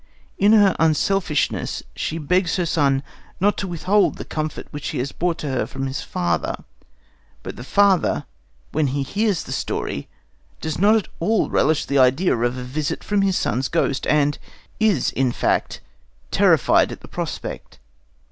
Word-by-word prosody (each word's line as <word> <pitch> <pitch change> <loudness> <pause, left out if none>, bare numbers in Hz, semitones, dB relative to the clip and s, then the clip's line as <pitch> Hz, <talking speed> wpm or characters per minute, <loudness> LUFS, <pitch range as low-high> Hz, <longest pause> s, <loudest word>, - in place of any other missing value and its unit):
In 205 +2 +5
her 205 -4 +5
unselfishness, 160 +1 +1
she 160 - -3
begs 170 +3 +1
her 180 - 0
son 140 -4 +1 0.4
not 205 +3 +3
to 195 - -3
withhold 185 +4 +1
the - - -7
comfort 155 -1 -4
which 145 0 -5
he - - -3
has 130 +2 -2
brought 175 -1 -1
to 150 - -4
her 130 - -1
from 135 0 -4
his 135 +1 -3
father. 85 -2 -2 0.8
But - - -6
the 120 - -8
father, 200 +5 +2 0.5
when 155 -1 +1
he 135 +1 -1
hears 200 +5 0
the - - -9
story, - - -3 0.5
does 160 -1 -4
not 210 +3 +5
at 220 - 0
all 210 +5 +1
relish 155 +1 +2
the 140 0 +1
idea 135 +8 +4
of 120 +2 -1
a 125 - -5
visit 140 +4 -3
from 205 -1 +1
his 195 -2 +2
son's 130 +2 0
ghost, 155 -4 0
and 145 -1 +2 0.4
is, 210 - +2
in 130 -1 +1
fact, - - -1 0.5
terrified - - +4
at - - -8
the - - -11
prospect. - - -6
155 Hz, 165 wpm, -22 LUFS, 135-195 Hz, 0.8 s, In